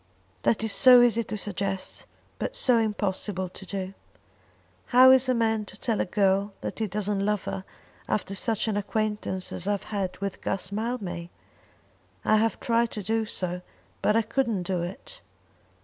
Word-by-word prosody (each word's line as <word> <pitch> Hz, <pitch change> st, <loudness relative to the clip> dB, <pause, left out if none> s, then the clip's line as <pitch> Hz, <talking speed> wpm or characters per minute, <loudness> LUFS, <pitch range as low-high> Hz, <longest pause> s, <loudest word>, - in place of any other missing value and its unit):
"That 220 Hz, -, +1 dB
is 220 Hz, -, +2 dB
so 250 Hz, 0 st, +8 dB
easy 235 Hz, -1 st, +3 dB
to 215 Hz, -, -4 dB
suggest, 195 Hz, -1 st, -3 dB, 0.3 s
but -, -, -3 dB
so 250 Hz, -, +4 dB
impossible 200 Hz, -3 st, -2 dB
to 190 Hz, -, -11 dB
do. 190 Hz, -1 st, -4 dB, 0.9 s
How 255 Hz, +1 st, +8 dB
is 260 Hz, 0 st, +5 dB
a 255 Hz, -, +3 dB
man 225 Hz, -2 st, +1 dB
to 200 Hz, +1 st, -11 dB
tell 225 Hz, -3 st, 0 dB
a -, -, 0 dB
girl 195 Hz, +1 st, +1 dB
that -, -, -5 dB
he 220 Hz, -, 0 dB
doesn't 205 Hz, 0 st, -1 dB
love 210 Hz, -1 st, 0 dB
her 190 Hz, -, -4 dB, 0.5 s
after 205 Hz, -2 st, -1 dB
such 220 Hz, +3 st, -1 dB
an 210 Hz, -2 st, 0 dB
acquaintance 210 Hz, -2 st, -2 dB
as 180 Hz, -, -5 dB
I 205 Hz, -, +3 dB
have 200 Hz, -, -3 dB
had 195 Hz, -3 st, -3 dB
with 200 Hz, -1 st, -4 dB
Guss 190 Hz, 0 st, -2 dB
Mildmay? 205 Hz, -6 st, -3 dB, 1.0 s
I 215 Hz, -, +5 dB
have 225 Hz, +1 st, +1 dB
tried 235 Hz, 0 st, +1 dB
to 210 Hz, -, -4 dB
do 220 Hz, +2 st, 0 dB
so, 180 Hz, -3 st, -3 dB, 0.4 s
but 210 Hz, -, +2 dB
I 225 Hz, -, +3 dB
couldn't 230 Hz, -4 st, 0 dB
do 180 Hz, -1 st, -1 dB
it. 190 Hz, -, -8 dB
210 Hz, 175 wpm, -27 LUFS, 195-225 Hz, 1.0 s, so